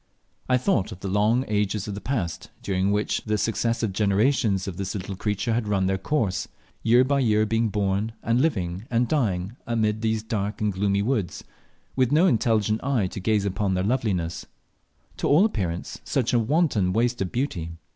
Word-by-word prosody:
I 125 - +4
thought 120 - 0
of 95 -2 -9
the - - -4
long 105 +6 +2
ages 105 -1 -1
of 105 - -4
the 100 - -6
past, 100 - -3
during 95 0 0
which 105 +1 0
the 105 -1 0
successive 115 -1 0
generations 105 0 +2
of 90 -3 -5
this 100 +1 -3
little 95 0 -4
creature 105 +3 -1
had 115 -1 -1
run 100 -2 +1
their 95 0 0
course 100 -4 -1 0.3
year 120 +3 +5
by 140 +1 +1
year 110 -4 +3
being 115 +1 +1
born, 100 +2 -1
and 115 +2 +2
living 95 - -1
and 120 0 +1
dying 110 - -1
amid 110 -2 0
these 110 -1 0
dark 105 -2 -3
and 105 -2 0
gloomy 100 +1 +1
woods, 110 -6 -1 0.5
with 130 -2 +2
no 160 +5 +5
intelligent 110 - +2
eye 130 -7 +1
to - - -6
gaze 105 +1 +1
upon 95 0 0
their 90 - 0
loveliness; 100 -8 -1 0.7
to - - -1
all 160 +8 +5
appearance 90 - -3
such 125 -3 0
a 120 - +4
wanton 115 - +1
waste 120 +2 +1
of 95 - -2
beauty. 120 - -2
105 Hz, 185 wpm, -25 LUFS, 95-120 Hz, 0.7 s, year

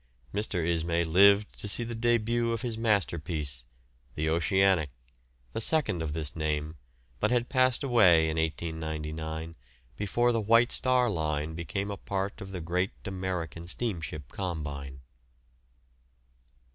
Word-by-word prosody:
Mr. 95 -5 0
Ismay 85 0 +1
lived 100 +5 +4
to - - -4
see 110 +4 +2
the 120 0 -5
début 115 0 +1
of 115 +1 -3
his 120 -3 -2
masterpiece, 80 - -1 0.5
the 80 +1 -1
"Oceanic," 90 -1 +2 0.6
the - - -2
second 135 - +2
of 80 -2 -3
this 75 -2 0
name, 75 0 -2 0.4
but - - +2
had 125 -1 +1
passed 130 +1 +2
away 95 -11 +5
in 80 - -1
1899 80 0 -3 0.4
before 120 +4 +1
the 115 -1 0
White 115 +3 +4
Star 130 -1 +3
Line 80 -5 -1
became 95 +5 -3
a 100 - -5
part 100 +2 -3
of 95 - -7
the 90 -2 -5
great 90 +4 -1
American 90 -4 -4
steamship 80 - -4
combine. 70 -7 -5
90 Hz, 135 wpm, -29 LUFS, 80-110 Hz, 0.6 s, away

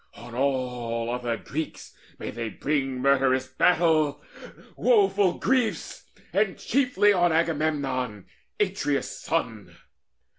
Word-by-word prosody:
On 120 0 -11
all 125 -3 -1
other 120 -2 -2
Greeks 155 +7 -6 0.2
May - - -5
they 115 0 -4
bring 135 +1 -2
murderous 135 -1 +3
battle, 155 +1 +2 0.5
woeful 390 - +3
griefs, 255 -4 -1 0.3
And 200 -1 +1
chiefly 240 -6 +2
on 175 -2 +3
Agamemnon, 145 - -1 0.3
Atreus' 185 -8 -1
son! 115 - -3
140 Hz, 100 wpm, -26 LUFS, 125-175 Hz, 0.5 s, murderous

